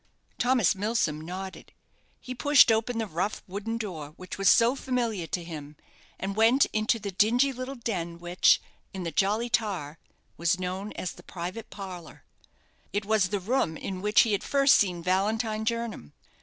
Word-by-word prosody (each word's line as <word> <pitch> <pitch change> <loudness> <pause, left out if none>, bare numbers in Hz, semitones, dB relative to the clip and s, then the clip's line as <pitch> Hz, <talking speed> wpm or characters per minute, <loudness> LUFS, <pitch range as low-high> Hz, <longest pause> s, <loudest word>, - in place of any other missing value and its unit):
Thomas 245 -6 +3
Milsom 195 -7 -1
nodded. 185 +3 -8 0.5
He 255 - -7
pushed 255 0 +6
open 225 +2 0
the 225 - 0
rough 190 +2 -3
wooden 205 +4 -4
door 165 -9 -6
which 185 - -7
was 195 - +5
so 235 +2 +5
familiar 235 -10 -2
to 175 - -3
him, 150 -3 -8 0.4
and 195 +1 -3
went 230 +5 +5
into 215 +2 +2
the 205 -2 -5
dingy 240 +8 +3
little 255 +2 -6
den 180 -9 -4
which, 175 +1 +3 0.4
in 190 - -4
the 165 - -3
'Jolly 210 +6 +1
Tar', 190 -10 -2 0.4
was 170 +2 +1
known 185 +3 -4
as 180 - -4
the - - -13
private 185 +5 -7
parlour. 185 -5 -9 0.7
It 205 0 -2
was 210 -3 +2
the 205 - -1
room 190 -5 0
in 185 -1 -5
which 210 0 +5
he 225 - +1
had 200 - 0
first 275 -1 +4
seen 180 -4 0
Valentine 215 +4 0
Jernam. 230 - -3
205 Hz, 170 wpm, -27 LUFS, 180-230 Hz, 0.7 s, pushed